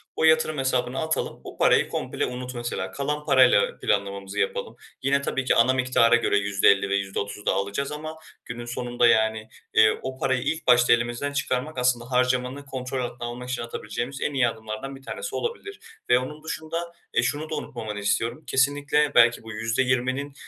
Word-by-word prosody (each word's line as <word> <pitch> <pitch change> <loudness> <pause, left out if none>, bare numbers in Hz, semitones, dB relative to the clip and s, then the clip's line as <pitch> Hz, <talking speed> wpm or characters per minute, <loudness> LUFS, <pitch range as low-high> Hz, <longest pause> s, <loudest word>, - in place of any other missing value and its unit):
O - - -1
yatırım 160 -1 +4
hesabına 130 -1 0
atalım, 160 0 -2
o - - -10
parayı - - +4
komple - - -2
unut, 125 0 -6
mesela. 120 -6 -4
Kalan 150 +5 -3
parayla 130 -8 +4
planlamamızı 100 -1 -2
yapalım. 485 0 -2 0.3
Yine 140 +1 +2
tabii 135 -1 -2
ki - - +3
ana 130 +3 +5
miktara 125 -2 +4
göre 120 - +2
%50 100 0 +3
ve 100 - +1
%30 100 +1 -3
daha - - +2
alacağız 100 +9 -2
ama 155 +1 -6 0.3
günün 120 +1 -7
sonunda, 120 0 +1
yani, 110 -1 +2 0.2
eee, 110 0 +5
o 130 0 -5
parayı 130 -1 0
ilk 165 0 -2
başta 125 -1 +6
elimizden 120 +4 -1
çıkarmak, 140 +1 -2
aslında 125 0 0
harcamanı 125 +2 0
kontrol 130 -1 -4
altına 120 0 -6
almak 125 +1 -7
için 130 - -2
atabileceğimiz 120 +3 -5
en 145 - -1
iyi 130 -3 +3
adımlardan 110 +4 -6
bir 135 - -13
tanesi 480 - -6
olabilir. 460 -4 -4 0.3
Ve 125 - +6
onun 150 +4 -7
dışında, 165 +2 -4 0.2
eee, 120 - +2
şunu 150 +5 -2
da - - -2
unutmamanı 110 -7 -5
istiyorum; 115 +7 -1
kesinlikle 145 +2 +2
belki 115 0 +5
bu 110 - -9
%20'nin, 125 +5 0
125 Hz, 175 wpm, -25 LUFS, 115-140 Hz, 0.3 s, başta